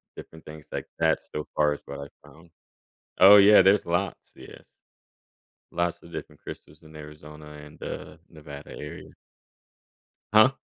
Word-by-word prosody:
different 80 0 -13
things 75 0 -12
like - - -5
that, - - +2
so 75 - -7
far 75 -1 +2
is - - -9
what - - -8
I 70 - -8 0.2
found 80 +4 -19 0.7
Oh, 100 +2 +9
yeah, 100 0 +8
there's 95 +2 +4
lots, 90 +3 -3
yes. - - -15 0.9
Lots 85 0 -2
of 85 - -15
different - - -9
crystals 75 +2 -11
in 80 - -16
Arizona 75 0 -12 0.2
and, 75 - -17
uh, 75 - -7
Nevada 75 -2 -11
area. 75 - -10 1.2
Huh? 110 +5 +6
80 Hz, 145 wpm, -26 LUFS, 75-90 Hz, 1.2 s, Oh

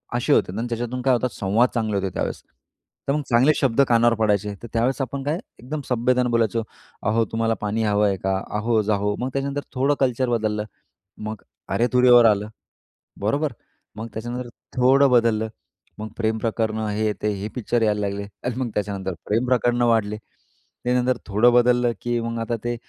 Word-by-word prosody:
अशी - - +2
होते - - +2
आणि 115 +2 -2
त्याच्यातून 120 +2 -3
काय 130 0 +3
होतं 125 +1 +1
संवाद 110 +6 +2
चांगले 110 -3 0
होते 95 0 -1
त्यावेळेस. - - -3 0.7
तर 140 - +2
मग 150 - 0
चांगले 125 +4 +5
शब्द 135 -1 +3
कानावर 120 0 +4
पडायचे 105 -2 +1
तर - - -6
त्यावेळेस 125 +4 +1
आपण 135 +1 -3
काय 150 +5 -1 0.2
एकदम 145 +5 -5
सभ्यतेने 125 +1 +2
बोलायचो. 115 -1 +1 0.4
अहो, 110 +2 +2
तुम्हाला 115 0 +1
पाणी 105 +2 -1
हवं 105 -1 +2
आहे 100 - +1
का? 95 +1 -1 0.2
अहो, 110 0 +2
जाहो. 105 0 0
मग 125 - -2
त्याच्यानंतर 140 +1 -2
थोडं 135 +3 +2
कल्चर 130 -1 +1
बदललं. 110 -3 0 0.5
मग 110 -1 -6 0.3
अरे-तुरे 125 +1 +3
वर 120 -1 +8
आलं, 105 -1 +3 0.7
बरोबर? 140 +8 0 0.4
मग 110 +1 -6
त्याच्यानंतर 120 +3 -5 0.3
थोडं 135 +2 +5
बदललं, 115 -2 +3 0.5
मग 110 +1 -5
प्रेम 110 -1 0
प्रकरणं 110 -1 -1
हे, 105 +1 0
ते 105 - +1
हे 105 - -3
पिक्चर 120 -1 0
यायला 105 -1 +2
लागले 100 0 -2 0.2
आणि 125 -2 -2
मग 125 - -1
त्याच्यानंतर 100 -2 -2
प्रेम 115 +4 +1
प्रकरणं 120 -1 +2
वाढले. 105 -2 +1 0.7
त्यानंतर 125 +1 +2
थोडं 110 +4 +4
बदललं, 120 0 +4
की 120 0 -1
मग 115 0 -3
आता 115 +1 -2
ते 120 0 -1
115 Hz, 175 wpm, -23 LUFS, 105-125 Hz, 0.7 s, वर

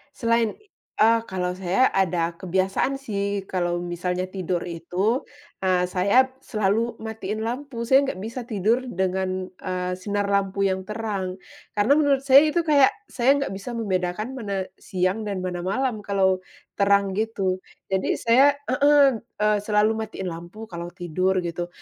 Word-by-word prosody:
Selain, 230 -2 +1 0.4
eee, 230 +1 +5
kalau 180 -1 -2
saya 190 +8 +2
ada 175 -3 +1
kebiasaan 190 +8 0
sih. 200 -6 -3
Kalau 175 -1 -1
misalnya 180 +1 -2
tidur 185 -2 -2
itu, 180 - -1 0.3
eee, 185 -1 +2
saya 205 +8 +3
selalu 220 0 0
matiin 220 -1 -4
lampu. 245 0 -4
Saya 265 +3 +4
nggak 185 - -4
bisa 235 +2 -6
tidur 220 +2 +1
dengan, 185 -2 -2
eee, 180 -1 -3
sinar 205 +1 -1
lampu 200 0 +1
yang 190 -1 0
terang. 210 -4 -3 0.4
Karena 240 +9 +4
menurut 280 -2 +2
saya 275 +3 +7
itu 335 +2 +1
kayak, 290 -4 +4 0.2
saya 265 +3 +3
nggak - - -4
bisa 195 +5 -6
membedakan, 195 +1 -2
mana 200 -4 -2 0.2
siang 185 +4 -1
dan 195 -3 -3
mana 180 -1 -3
malam, 215 +5 -1
kalau 195 -2 +1 0.4
terang 200 -1 +3
gitu. 195 -3 -1 0.3
Jadi 190 0 +1
saya 265 +5 +4 0.2
heeh. 280 -2 +5
Eee, 210 -2 0
selalu 210 +1 +2
matiin 190 -5 -4
lampu 175 +6 -9
kalau 170 -5 -6
tidur, 185 +1 0
gitu. 175 0 -3
200 Hz, 145 wpm, -24 LUFS, 185-230 Hz, 0.4 s, saya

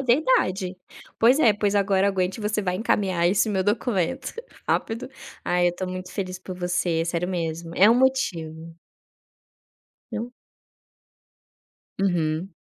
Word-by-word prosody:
É - - -3
verdade, 240 - +2 0.4
pois 245 +5 +5
é, 235 -8 +6
pois 205 0 0
agora 195 -1 +3
aguente, 190 +1 -1
você 210 0 0
vai 180 -2 -1
encaminhar 185 -4 +1
esse 205 +4 +2
meu 190 -2 +1
documento 210 +2 -1 0.3
rápido. 235 +3 -1 0.4
Ah, 180 0 +2
eu 175 0 +2
tô 185 - -4
muito 185 0 -6
feliz 185 -2 -4
por 185 0 -8
você, 175 -2 0
sério 170 +1 -1
mesmo. 165 -2 -3
É 200 +3 +7
um 230 - +6
motivo. 165 -11 0 1.4
Não. 235 +2 -4 1.7
Uhum. 175 -1 0
190 Hz, 135 wpm, -24 LUFS, 175-215 Hz, 1.7 s, É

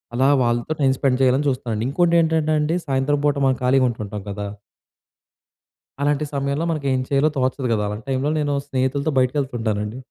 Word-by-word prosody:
అలా 130 +2 +3 0.2
వాళ్ళతో 120 +5 0
time 135 -1 +4
spend 135 -2 +1
చేయాలని 130 +3 +3
చూస్తానండి. 115 -4 -2
ఇంకోటేంటంటే 160 0 +2
అండి, 160 +3 0
సాయంత్రం 135 +2 +1
పూట 145 0 +2
మనం 130 -1 +1
ఖాళీగా 130 +1 +4
ఉంటుంటాం 105 -2 -6
కదా! 100 +1 -5 1.5
అలాంటి 145 +1 +1
సమయంలో 140 +3 -1
మనకేం 140 -4 0
చేయాలో 140 +2 +2
తోచదు 130 0 0
కదా! 105 -2 0
అలాంటి 105 +2 -5
టైంలో 135 +2 0
నేను 145 -1 0
స్నేహితులతో 135 +2 -1
బయటికెళ్తుంటానండి. 120 -5 -1
135 Hz, 150 wpm, -21 LUFS, 125-145 Hz, 1.5 s, time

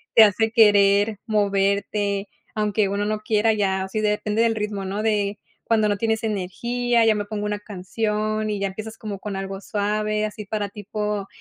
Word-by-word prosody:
te 225 - +10
hace 220 +2 +3
querer 205 -1 +5
moverte, 200 -1 0 0.3
aunque 210 -1 +1
uno 200 +1 -1
no 215 0 -1
quiera 215 +1 +2
ya. 190 -2 0
Sí, 215 +2 -2
depende 210 +1 0
del 230 -1 +2
ritmo, 210 -2 -3
¿no? 200 +3 -3
De 210 -2 0 0.3
cuando 220 -2 +3
no 205 - +2
tienes 220 +1 0
energía, 235 +4 0
ya 220 -1 +4
me 205 - -1
pongo 210 0 -4
una 210 0 -2
canción 215 +2 -2
y 205 -1 -2
ya 200 - 0
empiezas 215 +3 -7
como 205 -3 -6
con 205 0 -5
algo 195 0 -5
suave, 210 +1 -1
así 210 0 -6
para 205 0 -2
tipo 210 0 -4
210 Hz, 180 wpm, -23 LUFS, 200-215 Hz, 0.3 s, te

